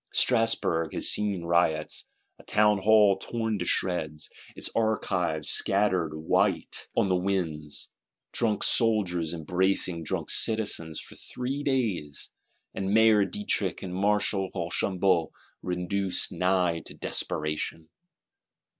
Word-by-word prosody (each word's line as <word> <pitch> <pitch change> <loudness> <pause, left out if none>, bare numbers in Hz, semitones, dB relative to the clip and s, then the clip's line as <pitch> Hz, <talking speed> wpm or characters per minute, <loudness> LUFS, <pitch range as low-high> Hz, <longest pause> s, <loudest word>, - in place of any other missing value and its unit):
Strasburg 115 -9 +2
has - - +2
seen 100 -4 0
riots: 85 -2 0 0.3
a - - -15
Townhall 105 -1 +4
torn 110 0 -3
to 90 - -2
shreds, 80 -5 -1 0.2
its - - -3
archives 95 -8 0
scattered 95 -6 +1
white 80 +1 0
on - - +3
the 95 - +2
winds; 85 -6 -2 0.4
drunk 110 -3 0
soldiers 95 -8 +1
embracing 90 +1 0
drunk - - -3
citizens 105 -8 0
for - - -10
three 130 +3 -5
days, 110 - -2 0.4
and 95 0 -3
Mayor 110 -1 +5
Dietrich 105 - -1
and 90 -2 -5
Marshal 100 0 +1
Rochambeau 90 0 0 0.3
reduced 90 +1 -1
nigh 90 -1 +1
to - - -12
desperation. 75 +1 -2
95 Hz, 110 wpm, -27 LUFS, 85-105 Hz, 0.4 s, Mayor